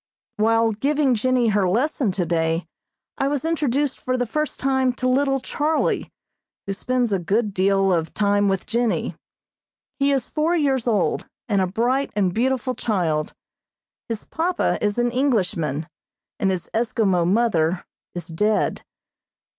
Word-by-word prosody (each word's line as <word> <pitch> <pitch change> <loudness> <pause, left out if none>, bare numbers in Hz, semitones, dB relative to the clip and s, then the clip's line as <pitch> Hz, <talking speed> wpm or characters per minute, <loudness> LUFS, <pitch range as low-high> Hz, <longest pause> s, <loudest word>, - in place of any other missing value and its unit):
While 225 +1 +3
giving 280 +5 +1
Jennie 245 +1 +2
her 200 -3 +2
lesson 245 +1 +1
today 170 -2 0 0.5
I 275 - +2
was 285 0 -1
introduced 290 -4 0
for 255 0 -1
the 245 - 0
first 305 +5 -3
time 265 -1 +1
to 255 +1 -2
little 270 +1 +2
Charlie, 300 +4 -1 0.5
who 195 - -2
spends 245 +2 0
a 195 - +1
good 205 +4 0
deal 195 0 +2
of 165 -2 -1
time 205 -1 +2
with 195 -1 0
Jennie. 235 0 -1 0.8
He 280 +1 +3
is 270 -3 0
four 320 +3 0
years 270 -6 +1
old, 220 -3 +1 0.2
and 200 -4 +2
a 185 - +1
bright 245 +8 0
and 190 -4 +1
beautiful 255 +3 0
child. 175 -10 -1 0.7
His 225 -2 -4
papa 345 +3 0
is 205 +1 0
an 240 0 +1
Englishman, 190 - 0 0.5
and 195 - +2
his 185 -2 -2
Eskimo 220 -6 +1
mother 185 -6 +1 0.3
is 175 -1 -5
dead. 210 +6 0
225 Hz, 145 wpm, -22 LUFS, 195-265 Hz, 0.8 s, While